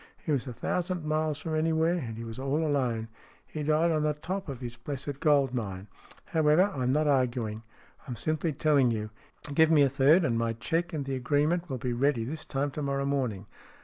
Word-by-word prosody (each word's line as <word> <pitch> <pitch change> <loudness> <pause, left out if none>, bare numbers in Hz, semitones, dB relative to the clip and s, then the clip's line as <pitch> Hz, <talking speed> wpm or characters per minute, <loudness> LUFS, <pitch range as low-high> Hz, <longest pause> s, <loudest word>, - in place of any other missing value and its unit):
He 155 - -4
was 140 -2 0
a 125 - -5
thousand 180 +5 -2
miles 155 -1 0
from 160 +2 -5
anywhere, 160 +1 +2
and 120 -11 -4
he 115 - -5
was 115 +1 -7
all 140 +4 0
alone. 125 -7 0 0.4
He 155 - -6
died 155 +3 +2
on 155 -1 +1
the 150 0 +1
top 185 +4 -4
of 135 -3 -5
his 120 -2 -6
blessed 140 +3 -5
gold 140 -4 +3
mine. 100 -5 -4 0.4
However, 160 +5 +3
I'm 130 -2 0
not 150 +3 +2
arguing. 125 -6 0 0.5
I'm 125 - -4
simply 155 +4 -1
telling 145 -3 +3
you. 110 -2 -3 0.4
Give 160 +2 +5
me 155 -3 +6
a 140 - +4
third, 140 +6 +4
and 115 -5 +1
my 115 0 0
cheque 165 +10 -2
and 150 -4 -3
the 135 - -3
agreement 150 +7 +1
will 130 - -2
be 125 -1 -2
ready 130 -1 +1
this 155 +6 -5
time 140 +1 -2
to 150 - -5
morrow 140 -1 -1
morning. 125 -8 -1
140 Hz, 210 wpm, -29 LUFS, 125-155 Hz, 0.5 s, me